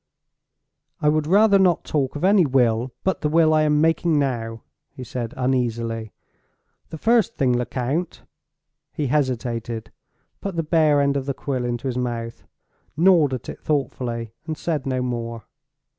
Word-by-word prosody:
"I 150 - +2
would 155 0 +1
rather 200 +2 +5
not 180 -3 +3
talk 140 -3 -1
of 145 - -5
any 195 0 +5
will 125 -3 +1
but 190 - 0
the 150 - 0
will 160 0 +4
I 155 - +4
am 150 -1 +2
making 165 0 +2
now," 115 -5 -2 0.3
he 130 -2 -10
said 120 -1 -5
uneasily. 115 -3 -1 0.8
"The 160 - -7
first 230 +5 +2
thing, 130 -2 +2
Lecount—" 130 +7 -2 0.7
He 150 - -2
hesitated—put 125 - -4
the 165 - 0
bare 155 -2 +3
end 140 0 +1
of 135 0 -4
the 140 - -2
quill 130 -3 -3
into 120 +1 -3
his 125 -1 -1
mouth—gnawed 130 +6 -1
at 125 - -9
it - - -8
thoughtfully—and 130 0 -3
said 150 -5 -2
no 130 -1 -1
more. 115 -2 -4
135 Hz, 145 wpm, -22 LUFS, 120-155 Hz, 0.8 s, rather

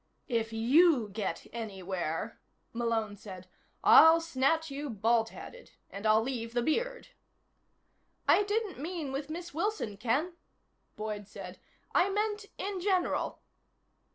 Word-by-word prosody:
"If 225 -2 0
you 250 +2 +4
get 205 +1 -4
anywhere," 195 -3 -4 0.3
Malone 230 -3 -1
said, 185 -3 -10 0.4
"I'll 325 +1 +8
snatch 320 0 0
you 285 +1 -4
baldheaded. 230 - -1 0.2
And 200 +2 -3
I'll 215 +1 +5
leave 235 -2 -4
the 240 - +2
beard." - - -1 1.2
"I - - +6
didn't 415 - -2
mean 320 -2 -4
with 280 +2 -4
Miss 345 +1 -6
Wilson, 330 - -2
Ken," 265 - 0 0.6
Boyd 210 -1 -5
said. - - -9 0.3
"I 360 +2 +4
meant 420 +1 -1
in 395 -1 -3
general." 370 -2 0
260 Hz, 120 wpm, -31 LUFS, 220-350 Hz, 1.2 s, I'll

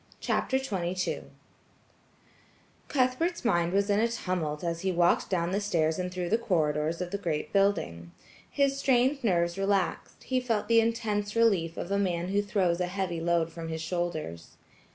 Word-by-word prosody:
CHAPTER 265 - 0
XXII 185 -8 -2 1.6
Cuthbert's 275 +5 0
mind 175 -6 +2
was 200 +1 +2
in 205 0 +2
a 230 - +3
tumult 180 -9 -3
as 170 -1 -2
he 190 - 0
walked 175 0 +2
down 175 -2 0
the 200 +2 0
stairs 160 -5 +1
and 180 0 -2
through 180 -1 -3
the 225 - +2
corridors 160 -4 0
of 180 -1 -4
the 200 - -2
great 155 -5 -3
building. 85 - +1 0.4
His 275 -1 +1
strained 265 +1 +2
nerves 170 -3 +1
relaxed; 195 -1 -1
he 260 -1 0
felt 225 -4 -1
the 230 0 +5
intense 220 -2 -1
relief 195 -8 +2
of 175 - -5
a 200 - +2
man 180 -2 -1
who 200 +1 +2
throws 190 -4 0
a 180 - 0
heavy 180 -3 -3
load 170 -1 +1
from 165 -1 -7
his 160 0 -4
shoulders. 160 - -4
185 Hz, 170 wpm, -28 LUFS, 170-215 Hz, 1.6 s, the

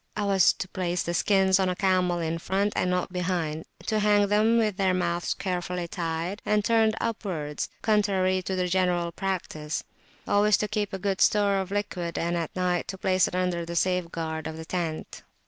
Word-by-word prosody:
I 210 - -1
was 195 -3 +5
to 185 - -5
place 180 -1 -2
the 170 - -2
skins 190 +1 +3
on 190 -1 +2
a 180 - -1
camel 185 -2 +2
in 165 0 -2
front, 200 +4 0
and 180 - +1
not 180 0 -1
behind; 170 -4 -2 0.2
to 215 -1 +1
hang 205 -1 +4
them 215 +3 +4
with 215 -4 +1
their 190 -2 +2
mouths 175 -1 -1
carefully 180 -2 -3
tied, 170 +3 -3
and 210 -1 +1
turned 225 -1 +3
upwards, 175 -10 -3
contrary 195 -3 +2
to 190 +1 -3
the 180 -1 0
general 180 -2 +1
practice; 170 -5 -3 0.4
always 205 0 +4
to 210 - -1
keep 210 -1 -2
a 195 - -3
good 190 0 -2
store 205 -1 +4
of 190 -1 -2
liquid, 185 -4 -3
and 170 +1 0
at 170 -2 -3
night 180 -1 0
to 190 - -5
place 185 0 +2
it - - -5
under 180 -2 0
the 170 +1 -6
safeguard 165 -3 -1
of 160 0 -6
the 160 - -7
tent. 165 -3 -4
185 Hz, 195 wpm, -27 LUFS, 170-200 Hz, 0.4 s, was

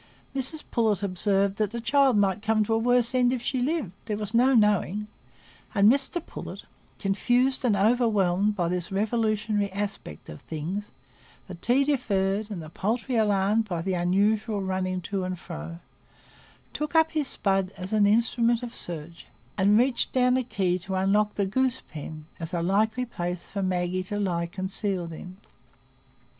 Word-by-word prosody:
Mrs 275 +4 -2
Pullet 220 -4 +1
observed 195 +1 +1
that 215 -2 +1
the 235 +3 -5
child 265 +1 +3
might 200 0 +2
come 220 0 +2
to 225 - -1
a - - +3
worse 245 +1 +3
end 250 -1 +3
if 255 - -1
she 250 +2 -2
lived, 285 - -1
there 210 -2 -2
was 210 0 -4
no 255 +3 +4
knowing; 210 -1 +2 0.7
and 205 +2 +6
Mr 280 +5 0
Pullet, - - -8 0.3
confused 245 +7 +1
and 235 -5 +3
overwhelmed 210 -3 +2
by 175 -4 0
this 180 +2 -3
revolutionary 215 -1 0
aspect 195 - -5
of 75 -1 -10
things,—the 155 -2 -8
tea 245 +10 +2
deferred 210 -7 0
and 185 -6 -5
the 155 - -10
poultry 235 +8 -2
alarmed 210 0 +2
by 175 -5 -3
the 190 +1 -1
unusual 205 +5 +1
running 185 -1 -2
to 195 +1 -3
and 185 0 -3
fro,—took 85 - -10
up 320 0 +5
his 305 -3 -1
spud 195 -4 0
as 185 +3 -6
an 210 -1 +4
instrument 235 +2 +2
of 240 - -6
search, 170 0 -7 0.3
and 205 +2 +4
reached 245 +1 +2
down 250 -1 +3
a 260 - +2
key 190 -6 0
to 190 +2 -4
unlock 205 +3 +2
the 200 - +1
goose 260 +6 0
pen, 155 0 -8
as 165 +2 -5
a 170 - -1
likely 220 +7 +1
place 175 -6 -5
for 200 - -3
Maggie 185 -1 0
to 205 +3 -4
lie 175 -4 -1
concealed 190 -1 -2
in. 180 +3 -10
205 Hz, 165 wpm, -26 LUFS, 185-235 Hz, 0.7 s, and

